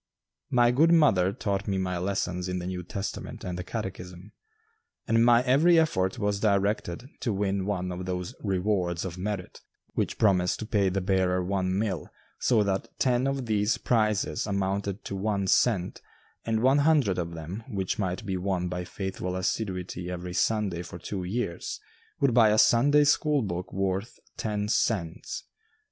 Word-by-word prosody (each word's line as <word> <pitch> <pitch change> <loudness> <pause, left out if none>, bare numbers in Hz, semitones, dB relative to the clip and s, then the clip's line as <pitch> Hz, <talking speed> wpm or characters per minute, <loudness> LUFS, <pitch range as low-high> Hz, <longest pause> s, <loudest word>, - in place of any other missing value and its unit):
My 120 -2 +4
good 155 +7 +4
mother 115 - +4
taught 100 0 -2
me 100 -1 0
my 90 -1 -1
lessons 90 -1 -2
in 90 - -2
the 90 - -4
New 90 0 -3
Testament 95 +3 -6
and 90 - -4
the 90 - -4
Catechism, 95 -2 -6 0.8
and 115 0 +4
my 120 0 +5
every 150 +7 +5
effort 95 -13 +2
was 105 -1 0
directed 100 0 0
to 120 - -1
win 100 -1 -1
one 90 -3 -2
of 90 +1 -5
those 90 -1 -3
"Rewards 95 -3 0
of 90 -1 -6
Merit," 100 -1 -4 0.3
which - - -1
promised 90 -4 +3
to 110 - -5
pay 100 -3 +2
the 95 +1 -1
bearer 90 -1 +1
one 95 -1 0
mill, 100 -5 -2 0.3
so 115 -4 +3
that 95 -1 -1
ten 125 0 +2
of 135 -2 -2
these 105 -1 +1
prizes 110 -1 0
amounted 100 0 -2
to 100 - -4
one 100 0 -1
cent, 95 -2 +2 0.4
and 110 0 0
one 135 +3 +5
hundred 140 - +3
of 85 -1 -4
them, 85 +7 -6
which 95 +1 -2
might 95 +1 -2
be 95 -2 -2
won 90 -1 -1
by 90 0 -3
faithful 90 0 -4
assiduity 90 -2 -3
every 90 0 -5
Sunday 100 -4 0
for 90 - -8
two 95 +2 -5
years, 90 -2 -3 0.4
would 140 -3 +3
buy 115 -2 +6
a 105 - +3
Sunday 145 +7 +5
school 150 -1 +2
book 90 -2 -4
worth 95 +3 -2 0.2
ten 105 -1 -2
cents. 95 -6 -1
100 Hz, 165 wpm, -27 LUFS, 90-110 Hz, 0.8 s, buy